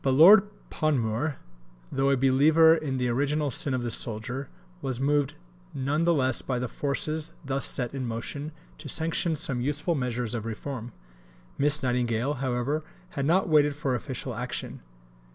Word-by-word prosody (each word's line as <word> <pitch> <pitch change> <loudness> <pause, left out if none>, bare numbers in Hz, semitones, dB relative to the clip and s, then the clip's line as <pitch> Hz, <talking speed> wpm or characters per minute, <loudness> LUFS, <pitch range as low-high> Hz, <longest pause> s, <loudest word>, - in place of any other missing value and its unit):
But 135 -1 +2
Lord 195 +7 +8 0.2
Panmure, 140 -1 0 0.5
though 135 0 +1
a 135 - +3
believer 150 +5 +5
in 150 -5 -3
the 125 -1 0
original 145 +3 0
sin 130 +2 0
of 125 - -2
the 120 - -2
soldier, 120 +5 -3 0.3
was 130 -2 -3
moved 145 0 +1 0.4
none 145 +5 0
the 170 - +4
less 130 -2 +2
by 130 - -2
the 125 +1 -2
forces 150 +4 -2
thus 135 0 0
set 125 -1 +2
in 130 -3 -3
motion 140 +6 -4 0.3
to 155 -2 -7
sanction 165 +2 +1
some 140 -5 -1
useful 150 +6 0
measures 125 -5 -2
of 115 -2 -4
reform. 120 +1 -6 0.7
Miss 145 +1 +3
Nightingale, 125 +1 0
however, 130 +4 -1 0.3
had 140 -1 -2
not 185 +4 +3
waited 150 -3 +3
for 145 -3 -1
official 125 - -4
action. - - -5
140 Hz, 160 wpm, -27 LUFS, 125-150 Hz, 0.7 s, Lord